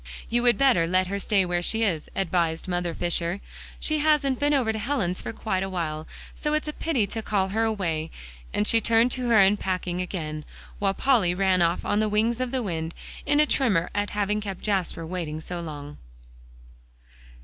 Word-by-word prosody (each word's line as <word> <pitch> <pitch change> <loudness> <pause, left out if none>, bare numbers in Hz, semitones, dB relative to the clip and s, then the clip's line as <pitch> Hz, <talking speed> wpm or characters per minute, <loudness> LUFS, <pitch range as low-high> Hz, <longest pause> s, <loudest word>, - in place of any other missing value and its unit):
"You 240 +1 +2
would 240 -3 +4
better 240 -11 +4
let 185 +2 +2
her 200 +2 -3
stay 200 -1 +2
where 175 0 0
she 225 +5 0
is," 170 -8 -1
advised 170 -3 0
Mother 175 -2 -1
Fisher; 175 +1 -1 0.4
"she 310 -1 0
hasn't 290 -4 +2
been 290 0 +2
over 255 -6 +2
to 220 - -3
Helen's 210 -7 -1
for - - -4
quite 215 -4 -2
a 195 - -2
while, 160 -4 -3 0.3
so 300 0 -1
it's 305 - -1
a 300 - -3
pity 280 -11 0
to 225 +3 -4
call 195 -3 0
her 220 +3 +1
away," 170 -8 -1 0.4
and 210 - 0
she 230 - +4
turned 230 +2 +3
to 250 -1 -2
her 230 - +5
unpacking 190 -3 +2
again, 155 -4 -4 0.4
while 195 -1 +1
Polly 220 -10 +3
ran 190 -1 +3
off 170 +1 +1
on 205 - +1
the 215 0 +1
wings 225 +3 +1
of 255 - -1
the 255 -1 -1
wind, 165 -4 -3 0.3
in 290 - +3
a 300 - +6
tremor 215 - +1
at 205 0 -1
having 210 0 0
kept 195 -3 -5
Jasper 185 -5 -1
waiting 160 -3 -4
so 175 +2 -6
long. 150 -3 -8
195 Hz, 195 wpm, -26 LUFS, 175-230 Hz, 0.4 s, a